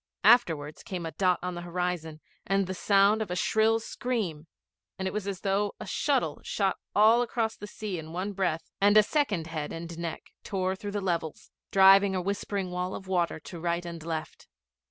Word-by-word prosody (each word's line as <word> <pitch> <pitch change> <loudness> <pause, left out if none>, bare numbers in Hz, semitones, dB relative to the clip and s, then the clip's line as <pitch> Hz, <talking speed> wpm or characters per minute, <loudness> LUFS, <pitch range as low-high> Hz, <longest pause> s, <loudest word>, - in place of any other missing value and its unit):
Afterwards, 165 -10 +4
came 180 -5 -5
a 165 - -4
dot 185 -1 +2
on 180 0 -2
the 175 - -6
horizon 175 -3 -3 0.3
and 195 0 +2
the 185 - -4
sound 200 +3 +3
of 215 - -3
a 180 - -2
shrill 220 +4 +2
scream, 215 -10 -3 0.5
and 190 - -2
it - - -3
was 210 -1 -3
as 195 -2 -4
though 200 +1 0
a - - -6
shuttle - - 0
shot 485 +1 0 0.2
all 220 +3 +6
across 230 -2 -1
the 205 - -9
sea 205 -4 -5
in 160 0 -9
one 185 +4 -3
breath, 175 -4 -2
and 205 +1 +6
a 215 - +8
second 210 - 0
head 155 -2 -4
and 170 0 -7
neck 170 -1 -5
tore 190 -1 -1
through 205 +1 -6
the 205 - -1
levels, 170 -4 -3 0.2
driving 195 0 +6
a - - +1
whispering 195 0 -3
wall 180 +1 -3
of 190 - -8
water 175 -4 0
to 170 +2 -9
right 170 +1 -1
and 170 -2 -7
left. 160 -1 -5
190 Hz, 195 wpm, -28 LUFS, 170-205 Hz, 0.5 s, a